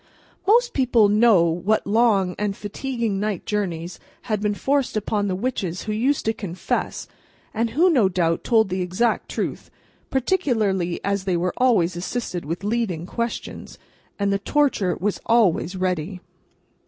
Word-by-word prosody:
Most 475 Hz, +3 st, +4 dB
people 240 Hz, -6 st, +3 dB
know 210 Hz, -3 st, +5 dB
what 180 Hz, +6 st, 0 dB
long 205 Hz, -4 st, +3 dB
and 205 Hz, -1 st, -1 dB
fatiguing 225 Hz, -1 st, -3 dB
night 205 Hz, -3 st, -2 dB
journeys 180 Hz, -5 st, -3 dB, 0.2 s
had 215 Hz, -4 st, -2 dB
been 210 Hz, -1 st, 0 dB
forced 275 Hz, -1 st, 0 dB
upon 205 Hz, -1 st, -1 dB
the 185 Hz, -, -1 dB
witches 190 Hz, -5 st, -3 dB
who 215 Hz, -, -3 dB
used 260 Hz, +7 st, 0 dB
to 220 Hz, -, +2 dB
confess, 185 Hz, -4 st, -3 dB, 0.5 s
and 230 Hz, +1 st, 0 dB
who, 310 Hz, +11 st, +3 dB
no 250 Hz, -, +4 dB
doubt, 170 Hz, -2 st, 0 dB
told 220 Hz, -4 st, +3 dB
the 185 Hz, 0 st, -2 dB
exact 185 Hz, +6 st, 0 dB
truth—particularly 225 Hz, -, -2 dB
as 200 Hz, -1 st, -1 dB
they 185 Hz, -3 st, +1 dB
were 180 Hz, +1 st, -1 dB
always 210 Hz, -9 st, +3 dB
assisted 180 Hz, -2 st, -4 dB
with 165 Hz, +6 st, -4 dB
leading 205 Hz, -6 st, -1 dB
questions, 235 Hz, +5 st, -5 dB, 0.4 s
and 200 Hz, -1 st, +1 dB
the 200 Hz, -, 0 dB
Torture 215 Hz, -, +1 dB
was 205 Hz, +2 st, -1 dB
always 200 Hz, -6 st, +2 dB
ready. 185 Hz, 0 st, -2 dB
205 Hz, 145 wpm, -23 LUFS, 185-235 Hz, 0.5 s, know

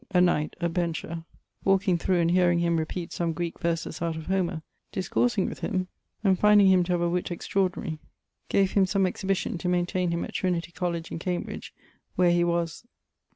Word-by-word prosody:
a 185 Hz, -2 st, +3 dB
knight, 175 Hz, -4 st, +2 dB
a 170 Hz, -, +1 dB
bencher, 165 Hz, -1 st, -3 dB, 0.4 s
walking 195 Hz, -1 st, +3 dB
thro' 180 Hz, +1 st, +1 dB
and 170 Hz, 0 st, +2 dB
hearing 175 Hz, -1 st, +4 dB
him 170 Hz, -1 st, +2 dB
repeat 165 Hz, +2 st, -3 dB
some 170 Hz, -1 st, -1 dB
Greeke 170 Hz, 0 st, -4 dB
verses 165 Hz, -1 st, -2 dB
out 165 Hz, -1 st, -1 dB
of 160 Hz, -1 st, -6 dB
Homer, 180 Hz, -4 st, -1 dB, 0.3 s
discoursing 195 Hz, +2 st, +1 dB
with -, -, -6 dB
him, 185 Hz, -3 st, -2 dB, 0.3 s
and 190 Hz, -3 st, +3 dB
finding 210 Hz, -1 st, +6 dB
him 190 Hz, -1 st, +5 dB
to 180 Hz, -, 0 dB
have 175 Hz, -, +1 dB
a 175 Hz, -, +2 dB
witt 175 Hz, +1 st, -1 dB
extraordinary, 175 Hz, -3 st, -1 dB, 0.5 s
gave 195 Hz, -1 st, +3 dB
him 195 Hz, -2 st, +3 dB
some 195 Hz, 0 st, +2 dB
exhibition 190 Hz, -1 st, -1 dB
to 180 Hz, -, -1 dB
maintaine 180 Hz, 0 st, +1 dB
him 170 Hz, 0 st, -1 dB
at -, -, -10 dB
Trinity 175 Hz, -2 st, -1 dB
college 170 Hz, -1 st, -3 dB
in -, -, -4 dB
Cambridge, 180 Hz, 0 st, -4 dB, 0.4 s
where 180 Hz, -1 st, +4 dB
he 175 Hz, 0 st, +3 dB
was 170 Hz, +1 st, -1 dB
175 Hz, 190 wpm, -27 LUFS, 170-185 Hz, 0.5 s, finding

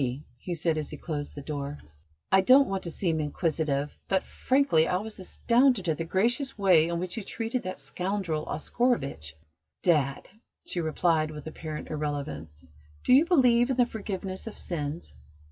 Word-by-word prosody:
"Niti," 130 Hz, +2 st, -2 dB, 0.2 s
he 175 Hz, +5 st, -4 dB
said, 160 Hz, -1 st, 0 dB
as 150 Hz, -, -5 dB
he 150 Hz, -, -7 dB
closed 145 Hz, -1 st, -5 dB
the 145 Hz, -, -7 dB
door, 145 Hz, -1 st, -4 dB, 0.5 s
"I 190 Hz, -, +6 dB
don't 265 Hz, +7 st, +6 dB
want 195 Hz, -1 st, -2 dB
to 170 Hz, -, -3 dB
seem 165 Hz, -2 st, 0 dB
inquisitive, 150 Hz, -2 st, -1 dB
but, 190 Hz, -1 st, +1 dB
frankly, 260 Hz, -, +2 dB
I 180 Hz, -, +1 dB
was 210 Hz, +2 st, -6 dB
astounded 235 Hz, +2 st, +2 dB
at 160 Hz, -1 st, 0 dB
the 165 Hz, -, -2 dB
gracious 240 Hz, -, +1 dB
way 180 Hz, -6 st, +5 dB
in 170 Hz, 0 st, -1 dB
which 180 Hz, +2 st, -4 dB
you -, -, -2 dB
treated 230 Hz, +4 st, -3 dB
that 185 Hz, -4 st, -6 dB
scoundrel 175 Hz, +3 st, -2 dB
Oscarovitch." 145 Hz, -, -1 dB, 0.5 s
"Dad," 145 Hz, -6 st, +2 dB, 0.4 s
she 175 Hz, -, -2 dB
replied, 160 Hz, 0 st, +1 dB
with 150 Hz, -1 st, -8 dB
apparent 155 Hz, -1 st, -6 dB
irrelevance, 115 Hz, -, -4 dB, 0.4 s
"do -, -, +4 dB
you 280 Hz, +5 st, +7 dB
believe 250 Hz, -7 st, +4 dB
in 260 Hz, -, 0 dB
the 245 Hz, -, +5 dB
forgiveness 195 Hz, -3 st, -5 dB
of 225 Hz, -, -7 dB
sins?" 150 Hz, -, -4 dB
170 Hz, 170 wpm, -28 LUFS, 150-210 Hz, 0.5 s, you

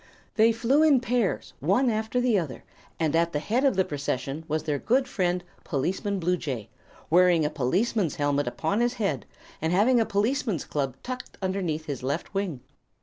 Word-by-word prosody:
They 225 Hz, +1 st, +5 dB
flew 235 Hz, +6 st, +2 dB
in 300 Hz, -4 st, +6 dB
pairs, 240 Hz, -4 st, -1 dB
one 195 Hz, -, +2 dB
after 220 Hz, +3 st, -1 dB
the 245 Hz, -2 st, +2 dB
other, 145 Hz, -8 st, -6 dB, 0.4 s
and 160 Hz, -1 st, +1 dB
at 170 Hz, +1 st, +2 dB
the 150 Hz, -, +1 dB
head 230 Hz, -, 0 dB
of 275 Hz, -6 st, +3 dB
the 190 Hz, 0 st, +2 dB
procession 140 Hz, +1 st, -3 dB
was 155 Hz, +1 st, -1 dB
their 145 Hz, -3 st, -1 dB
good 260 Hz, -, +2 dB
friend 180 Hz, -2 st, 0 dB, 0.2 s
Policeman 190 Hz, +7 st, -1 dB
Bluejay, 160 Hz, -, -2 dB, 0.4 s
wearing 175 Hz, -2 st, +5 dB
a 150 Hz, -, 0 dB
policeman's 175 Hz, -, 0 dB
helmet 145 Hz, 0 st, 0 dB
upon 200 Hz, -, -1 dB
his 240 Hz, +1 st, +1 dB
head 175 Hz, -, -2 dB, 0.3 s
and 160 Hz, +1 st, 0 dB
having 225 Hz, +7 st, +4 dB
a 225 Hz, -, +3 dB
policeman's 215 Hz, -, 0 dB
club 135 Hz, -3 st, -2 dB
tucked 255 Hz, 0 st, -6 dB
underneath 185 Hz, -5 st, -2 dB
his 140 Hz, -5 st, -4 dB
left 140 Hz, +9 st, -3 dB
wing. 190 Hz, -10 st, -2 dB
180 Hz, 175 wpm, -26 LUFS, 150-225 Hz, 0.4 s, in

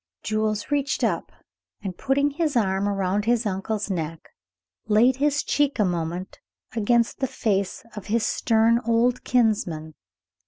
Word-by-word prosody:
Jules 215 Hz, +2 st, -1 dB
reached 280 Hz, -1 st, 0 dB
up, -, -, 0 dB, 0.5 s
and, 190 Hz, -3 st, -4 dB
putting 280 Hz, +5 st, +1 dB
his 305 Hz, -1 st, -1 dB
arms 195 Hz, -3 st, +1 dB
around 200 Hz, 0 st, 0 dB
his 235 Hz, 0 st, +2 dB
uncle's 205 Hz, +1 st, -2 dB
neck, 165 Hz, -2 st, -4 dB, 0.6 s
laid 235 Hz, +4 st, +4 dB
his 290 Hz, +1 st, +1 dB
cheek 290 Hz, -1 st, +1 dB
a 210 Hz, -, +3 dB
moment 175 Hz, +1 st, -3 dB, 0.4 s
against 235 Hz, +1 st, +1 dB
the 265 Hz, -, 0 dB
face 200 Hz, -6 st, -1 dB
of 210 Hz, -, -8 dB
his 225 Hz, +1 st, +1 dB
stern 230 Hz, 0 st, +3 dB
old 235 Hz, +2 st, +2 dB
kinsman. 195 Hz, -10 st, 0 dB
220 Hz, 135 wpm, -24 LUFS, 195-250 Hz, 0.6 s, laid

